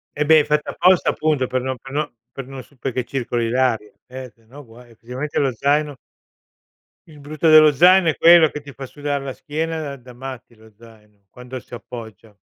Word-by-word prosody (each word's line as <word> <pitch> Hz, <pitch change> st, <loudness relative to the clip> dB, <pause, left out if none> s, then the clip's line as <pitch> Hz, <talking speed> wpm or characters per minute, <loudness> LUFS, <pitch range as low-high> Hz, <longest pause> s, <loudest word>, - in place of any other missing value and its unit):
Eh 150 Hz, -, -1 dB
beh, 160 Hz, 0 st, +6 dB
è -, -, +2 dB
fatta 150 Hz, 0 st, -1 dB
apposta 185 Hz, -1 st, +3 dB
appunto 150 Hz, -5 st, 0 dB
per 130 Hz, -1 st, -2 dB
non 130 Hz, 0 st, -4 dB
per 135 Hz, -, -12 dB
non 150 Hz, +1 st, -2 dB, 0.2 s
per 135 Hz, -, -8 dB
non 135 Hz, -1 st, -8 dB
su 140 Hz, -, -25 dB
perché 125 Hz, -1 st, -3 dB
circoli 120 Hz, -3 st, -3 dB
l'aria, 120 Hz, -4 st, 0 dB, 0.2 s
eh 130 Hz, -1 st, -9 dB
sennò 120 Hz, +6 st, -15 dB
guai 120 Hz, +1 st, -17 dB
effettivamente 125 Hz, +6 st, -5 dB
lo 135 Hz, -2 st, +1 dB
zaino 145 Hz, +2 st, 0 dB, 1.1 s
Il 150 Hz, -2 st, -15 dB
brutto 155 Hz, +3 st, -2 dB
dello 155 Hz, -1 st, +8 dB
zaino 180 Hz, +4 st, +5 dB
è -, -, -2 dB
quello, 165 Hz, -2 st, +7 dB
che 150 Hz, -, -7 dB
ti 140 Hz, -1 st, -13 dB
fa 135 Hz, -, -8 dB
sudar 145 Hz, +1 st, -4 dB
la 135 Hz, -1 st, -5 dB
schiena 160 Hz, +4 st, -4 dB
da 140 Hz, -3 st, -6 dB
da 125 Hz, -1 st, -15 dB
matti 130 Hz, -1 st, -10 dB
lo 110 Hz, -1 st, -20 dB
zaino, 105 Hz, -3 st, -20 dB
quando 125 Hz, +1 st, -10 dB
si 115 Hz, -, -19 dB
appoggia. 110 Hz, -2 st, -11 dB
135 Hz, 200 wpm, -20 LUFS, 120-150 Hz, 1.1 s, dello